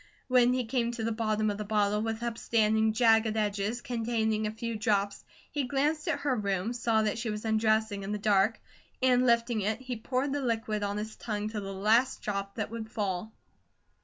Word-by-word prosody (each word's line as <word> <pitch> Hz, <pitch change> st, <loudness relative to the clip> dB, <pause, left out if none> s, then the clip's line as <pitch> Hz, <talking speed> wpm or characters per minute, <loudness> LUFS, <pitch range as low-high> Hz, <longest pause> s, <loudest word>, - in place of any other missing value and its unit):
When 250 Hz, -1 st, +5 dB
he 255 Hz, -1 st, 0 dB
came 235 Hz, 0 st, 0 dB
to 230 Hz, -2 st, -4 dB
the 230 Hz, -, 0 dB
bottom 215 Hz, -1 st, 0 dB
of 205 Hz, -, -6 dB
the -, -, -2 dB
bottle 210 Hz, 0 st, +1 dB
with 225 Hz, +1 st, -3 dB
upstanding, 220 Hz, -2 st, +2 dB
jagged 225 Hz, -1 st, +3 dB
edges, 210 Hz, +2 st, -1 dB
containing 225 Hz, -2 st, 0 dB
a -, -, -2 dB
few 230 Hz, +1 st, -4 dB
drops, 205 Hz, -2 st, 0 dB, 0.3 s
he 285 Hz, -2 st, -1 dB
glanced 300 Hz, +5 st, 0 dB
at 290 Hz, -3 st, 0 dB
her 280 Hz, -3 st, +1 dB
room, 200 Hz, 0 st, -1 dB
saw 230 Hz, -2 st, +1 dB
that 215 Hz, +1 st, -1 dB
she 230 Hz, -1 st, -2 dB
was 210 Hz, +1 st, -4 dB
undressing 220 Hz, -1 st, +1 dB
in 195 Hz, +1 st, -5 dB
the 210 Hz, -, -1 dB
dark, 205 Hz, +1 st, +2 dB, 0.4 s
and 255 Hz, -1 st, +4 dB
lifting 235 Hz, -1 st, +2 dB
it, 215 Hz, +3 st, -1 dB
he 255 Hz, -1 st, -5 dB
poured 255 Hz, +5 st, -1 dB
the 290 Hz, -, -1 dB
liquid 225 Hz, -4 st, -1 dB
on 205 Hz, 0 st, -2 dB
his 215 Hz, +1 st, -5 dB
tongue 210 Hz, -2 st, -3 dB
to 215 Hz, -1 st, -4 dB
the 195 Hz, 0 st, -5 dB
last 220 Hz, +7 st, +2 dB
drop 200 Hz, -1 st, -3 dB
that 215 Hz, -1 st, -3 dB
would 225 Hz, -1 st, -6 dB
fall. 205 Hz, -1 st, -3 dB
220 Hz, 200 wpm, -29 LUFS, 210-235 Hz, 0.4 s, When